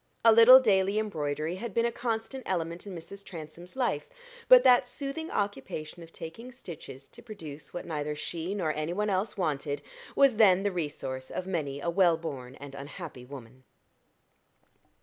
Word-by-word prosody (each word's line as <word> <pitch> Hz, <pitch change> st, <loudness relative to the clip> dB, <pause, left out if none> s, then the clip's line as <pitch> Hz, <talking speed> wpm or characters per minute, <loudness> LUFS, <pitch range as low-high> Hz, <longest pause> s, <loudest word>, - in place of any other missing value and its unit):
A 230 Hz, -, +9 dB
little 230 Hz, +3 st, +10 dB
daily 200 Hz, -4 st, +2 dB
embroidery 160 Hz, -5 st, -2 dB
had 225 Hz, 0 st, -6 dB
been 230 Hz, -, +3 dB
a 235 Hz, -, +1 dB
constant 235 Hz, +2 st, -3 dB
element 170 Hz, 0 st, -3 dB
in 195 Hz, -, -6 dB
Mrs. 195 Hz, +4 st, -9 dB
Transome's 170 Hz, +2 st, -9 dB
life; 255 Hz, -2 st, -1 dB, 0.4 s
but -, -, +9 dB
that 250 Hz, 0 st, +6 dB
soothing 285 Hz, +5 st, -5 dB
occupation 170 Hz, -4 st, -4 dB
of 165 Hz, 0 st, -12 dB
taking 225 Hz, +12 st, -9 dB
stitches 155 Hz, -, -10 dB
to 235 Hz, -, -14 dB
produce 165 Hz, -11 st, -9 dB
what 175 Hz, -, -6 dB
neither 150 Hz, -2 st, -3 dB
she 170 Hz, +5 st, -4 dB
nor 165 Hz, -6 st, 0 dB
any 155 Hz, +3 st, -3 dB
one 210 Hz, +2 st, 0 dB
else 195 Hz, +3 st, -1 dB
wanted, 145 Hz, -4 st, -2 dB, 0.3 s
was 275 Hz, -5 st, +5 dB
then 195 Hz, -4 st, +6 dB
the 205 Hz, -, +1 dB
resource 140 Hz, -6 st, -4 dB
of 185 Hz, -, -4 dB
many 150 Hz, -7 st, -3 dB
a 170 Hz, +4 st, -1 dB
well 170 Hz, -2 st, +4 dB
born 135 Hz, -6 st, -7 dB
and 140 Hz, 0 st, -10 dB
unhappy 140 Hz, -1 st, -8 dB
woman. 130 Hz, -1 st, -11 dB
175 Hz, 170 wpm, -29 LUFS, 150-215 Hz, 0.4 s, little